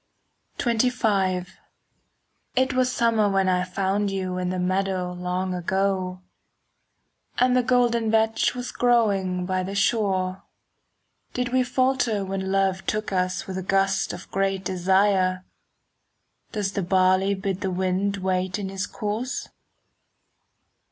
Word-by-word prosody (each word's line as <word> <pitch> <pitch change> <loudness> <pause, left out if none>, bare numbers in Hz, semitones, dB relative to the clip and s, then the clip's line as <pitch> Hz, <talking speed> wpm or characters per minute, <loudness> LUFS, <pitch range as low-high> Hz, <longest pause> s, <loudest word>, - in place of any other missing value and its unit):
XXV 220 -6 +1 1.1
It 260 +2 +2
was 255 0 +2
summer 225 -4 +2
when 195 -1 +2
I 180 -1 +2
found 195 +2 -1
you 185 -2 -3
In 180 0 -1
the 185 - -2
meadow 185 0 -1
long 180 +1 -2
ago,— 185 0 -1 1.1
And 250 0 +3
the 250 - +4
golden 240 -2 +2
vetch 220 +2 +2
was 245 0 -5
growing 200 -7 +1
By 185 0 0
the 195 +2 -5
shore. 195 -3 +1 0.9
Did 250 -1 -1
we 255 +1 +2
falter 250 -5 +1
when 190 0 -3
love 195 -1 +1
took 215 -1 -2
us 185 0 0
5 - - -14
With 190 - -4
a - - -3
gust 195 +1 +1
of 175 +1 -9
great 195 -1 -1
desire? 185 0 +2 1.1
Does 205 -3 -2
the 200 - -2
barley 185 +2 +3
bid 190 0 -3
the 190 - -1
wind 190 +2 0
wait 185 0 -1
In 200 -2 -4
his 195 +1 -3
course? 220 +6 -4
195 Hz, 130 wpm, -24 LUFS, 185-220 Hz, 1.1 s, the